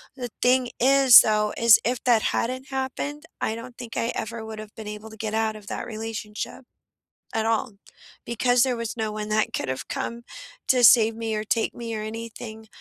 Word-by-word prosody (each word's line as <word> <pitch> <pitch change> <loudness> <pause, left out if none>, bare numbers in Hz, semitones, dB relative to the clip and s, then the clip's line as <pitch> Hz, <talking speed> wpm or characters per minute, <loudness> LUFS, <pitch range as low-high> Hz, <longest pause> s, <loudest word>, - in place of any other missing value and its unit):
the 250 -3 -5
thing 250 0 +3
is, 265 0 +8
though 210 -1 +1
is 230 -1 +7
if 245 0 -1
that 235 -3 +4
hadn't 255 +3 -1
happened, 270 +3 -4 0.2
I 220 - -1
don't 235 +2 -9
think 235 -2 -7
I 230 - 0
ever 225 0 -5
would 220 -1 -7
have 215 -1 -10
been 220 -2 -8
able 210 +1 -7
to 220 - -12
get 220 0 -4
out 220 0 0
of 210 -1 -12
that - - -5
relationship, 220 +1 -6 0.7
at 220 0 0
all, 225 +1 0 0.5
because 245 +1 +2
there 255 -2 0
was 230 0 -5
no 220 -1 -2
one 210 0 -5
that 215 +1 +1
could 135 - -3
have 130 +1 -4
come 235 0 -4 0.4
to 250 -1 +3
save 225 -1 +7
me 225 -1 -3
or 215 - -2
take 220 +1 -1
me 230 -1 -5
or 215 - -4
anything, 220 0 -8
225 Hz, 200 wpm, -24 LUFS, 220-245 Hz, 0.7 s, is